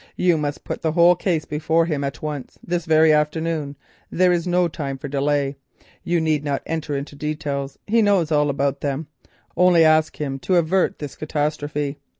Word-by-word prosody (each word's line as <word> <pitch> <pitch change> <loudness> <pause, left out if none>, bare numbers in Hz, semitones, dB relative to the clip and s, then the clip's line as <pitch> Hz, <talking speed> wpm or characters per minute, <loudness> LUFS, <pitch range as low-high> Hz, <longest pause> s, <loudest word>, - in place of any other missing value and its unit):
You 180 -2 +3
must 150 -2 -3
put - - -5
the 160 -1 0
whole 175 +1 +6
case 165 -4 -1
before 160 +3 +1
him 150 -4 -2
at 140 +1 -5
once—this 155 +3 -4
very 160 0 +5
afternoon, 150 -1 -1 0.3
there 180 +1 +3
is 175 0 0
no 180 0 +2
time 140 -4 -5
for 145 - -7
delay; 140 0 0 0.5
you 175 0 +1
need 155 -2 0
not 140 -2 -2
enter 160 -2 -3
into 140 +1 -7
details, 145 -2 -4
he 225 +2 +3
knows 195 -6 +2
all 150 -1 +3
about 140 0 -1
them—only 160 +4 0
ask 155 0 +3
him 135 -2 -3
to 185 - 0
avert 175 +2 +2
this 145 -2 -7
catastrophe. 150 -1 -2
155 Hz, 170 wpm, -22 LUFS, 145-165 Hz, 0.5 s, whole